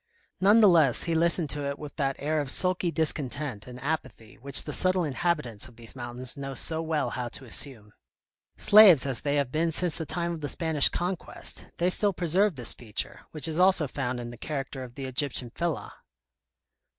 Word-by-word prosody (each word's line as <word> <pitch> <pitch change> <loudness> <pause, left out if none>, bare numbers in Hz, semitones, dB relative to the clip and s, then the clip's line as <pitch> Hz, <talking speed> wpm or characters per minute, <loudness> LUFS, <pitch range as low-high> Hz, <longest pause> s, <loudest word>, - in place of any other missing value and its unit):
None 205 +4 +5
the 210 - +8
less, 155 -9 +4
he 170 - -1
listened 165 -1 +1
to 145 -1 -3
it 140 0 -3
with 150 -2 -9
that 135 -2 0
air 155 +1 -1
of 140 - -4
sulky 180 +3 +2
discontent 145 -7 -1
and 125 0 -9
apathy 140 -6 -4
which 135 +2 +2
the - - -6
subtle 185 -1 +1
in 150 -4 -3
habitants 135 -9 -1
of 120 - -17
these 115 +1 -10
mountains 120 0 -5
know 135 -1 -6
so 160 +3 -1
well 160 -3 -1
how 125 -1 -3
to 130 +3 -8
assume. 110 -4 -3 0.6
Slaves 205 -10 +7
as 135 -4 -1
they 145 0 -1
have 140 -3 0
been 165 +2 0
since 170 0 +1
the 160 - -4
time 170 +1 -2
of 165 - -7
the 145 - -3
Spanish 160 -4 +3
Conquest, 180 0 -4
they 175 +2 +1
still 205 +1 +3
preserve 180 +2 +2
this 120 -3 0
feature, 110 -4 -5
which 155 -2 -3
is 160 +1 -3
also 185 -5 +4
found 125 -2 -3
in 120 0 -6
the 120 - -11
character 135 -3 -5
of 120 -1 -11
the 135 - -6
Egyptian 130 -2 -2
fellah. 170 +2 -3
145 Hz, 200 wpm, -27 LUFS, 130-170 Hz, 0.6 s, the